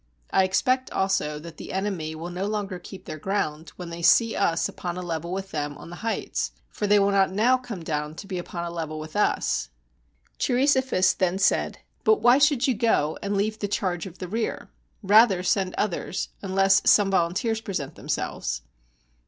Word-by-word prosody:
I 190 Hz, -, +5 dB
expect 255 Hz, +7 st, +1 dB
also 190 Hz, -6 st, 0 dB
that 160 Hz, +2 st, -10 dB
the -, -, -8 dB
enemy 185 Hz, -5 st, -2 dB
will 165 Hz, +3 st, -6 dB
no 185 Hz, +3 st, -3 dB
longer 205 Hz, -3 st, -3 dB
keep 185 Hz, +1 st, -11 dB
their 155 Hz, -, -7 dB
ground, 160 Hz, -4 st, -2 dB
when 175 Hz, -2 st, -8 dB
they 170 Hz, 0 st, -6 dB
see 230 Hz, +6 st, +5 dB
us 165 Hz, -4 st, +1 dB
upon 175 Hz, 0 st, -5 dB
a -, -, -3 dB
level 170 Hz, 0 st, -4 dB
with 195 Hz, +1 st, -4 dB
them 145 Hz, -1 st, -3 dB
on 170 Hz, -, -11 dB
the 175 Hz, -, -8 dB
heights, 225 Hz, 0 st, -2 dB, 0.2 s
for 210 Hz, -, -3 dB
they 205 Hz, +1 st, +5 dB
will 200 Hz, 0 st, +3 dB
not 195 Hz, -1 st, +3 dB
now 225 Hz, +6 st, +4 dB
come 245 Hz, -9 st, -6 dB
down 150 Hz, -1 st, -3 dB
to 200 Hz, -, -8 dB
be 190 Hz, -2 st, -4 dB
upon 175 Hz, 0 st, -5 dB
a 170 Hz, -, -4 dB
level 160 Hz, -2 st, -4 dB
with 155 Hz, +2 st, -8 dB
us." 210 Hz, -, +1 dB, 0.7 s
Cheiri 255 Hz, +2 st, +2 dB
sophus 260 Hz, -9 st, +3 dB
then 185 Hz, 0 st, +1 dB
said, 195 Hz, -, +1 dB, 0.3 s
"But 435 Hz, -1 st, +4 dB
why 245 Hz, +3 st, +5 dB
should 285 Hz, -3 st, +4 dB
you 260 Hz, -, +3 dB
go, 210 Hz, -9 st, +1 dB
and 200 Hz, 0 st, -1 dB
leave 215 Hz, +2 st, -1 dB
the 205 Hz, -, -1 dB
charge 185 Hz, -3 st, -2 dB
of 185 Hz, 0 st, -12 dB
the 185 Hz, -, -6 dB
rear? 220 Hz, +5 st, -3 dB, 0.3 s
Rather 205 Hz, -2 st, +5 dB
send 185 Hz, 0 st, +1 dB
others, 190 Hz, -2 st, -2 dB
unless 195 Hz, 0 st, +3 dB
some 200 Hz, -2 st, +5 dB
volunteers 195 Hz, +5 st, +1 dB
present 160 Hz, -9 st, -4 dB
themselves." -, -, -3 dB
190 Hz, 195 wpm, -25 LUFS, 170-210 Hz, 0.7 s, I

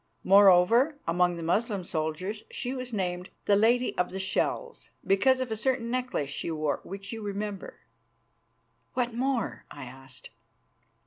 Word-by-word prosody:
Moreover, 200 Hz, -, +6 dB
among 175 Hz, +1 st, +2 dB
the 170 Hz, -, -6 dB
Moslem 200 Hz, +3 st, 0 dB
soldiers 175 Hz, +6 st, -3 dB
she 250 Hz, -, -4 dB
was 255 Hz, -1 st, -5 dB
named 180 Hz, -3 st, -3 dB, 0.2 s
'the 205 Hz, -, +4 dB
Lady 235 Hz, +4 st, +3 dB
of 180 Hz, -, +1 dB
the 190 Hz, -, -5 dB
Shells,' 190 Hz, -, -2 dB, 0.2 s
because 260 Hz, +7 st, +3 dB
of 255 Hz, -3 st, -3 dB
a -, -, 0 dB
certain 235 Hz, 0 st, -1 dB
necklace 250 Hz, -, -2 dB
she 140 Hz, -, -4 dB
wore, 155 Hz, -2 st, -1 dB
which 195 Hz, +3 st, -7 dB
you 225 Hz, -, -6 dB
will 205 Hz, -, -5 dB
remember." 205 Hz, -1 st, -5 dB, 1.1 s
"What 245 Hz, -2 st, 0 dB
more?" 255 Hz, -1 st, -1 dB
I 145 Hz, -, -9 dB
asked. 130 Hz, +1 st, -11 dB
200 Hz, 150 wpm, -28 LUFS, 175-240 Hz, 1.1 s, Moreover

